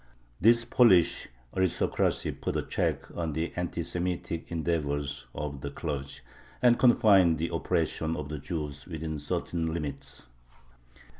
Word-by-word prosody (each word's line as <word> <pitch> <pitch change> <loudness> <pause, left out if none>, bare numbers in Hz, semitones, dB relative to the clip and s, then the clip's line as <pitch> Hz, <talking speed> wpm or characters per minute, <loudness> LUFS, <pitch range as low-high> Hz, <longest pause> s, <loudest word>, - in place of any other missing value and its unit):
This 115 +3 +5
Polish 115 -8 +4 0.3
aristocracy 95 -2 +1
put - - -3
a - - -1
check - - -2
on 80 -3 -2
the 80 +3 -2
anti 90 -1 -2
Semitic 85 -1 -3
endeavors 75 -4 -2
of 70 -2 -4
the 70 - -4
clergy, 70 -2 -5 0.4
and 120 -1 +4
confined 100 -9 +5
the 85 +2 -2
oppression 80 0 0
of 75 - -4
the 75 0 -5
Jews 75 -2 -5
within 80 -3 -4
certain 80 +3 -2
limits. 75 -6 -5
80 Hz, 130 wpm, -29 LUFS, 75-90 Hz, 0.4 s, This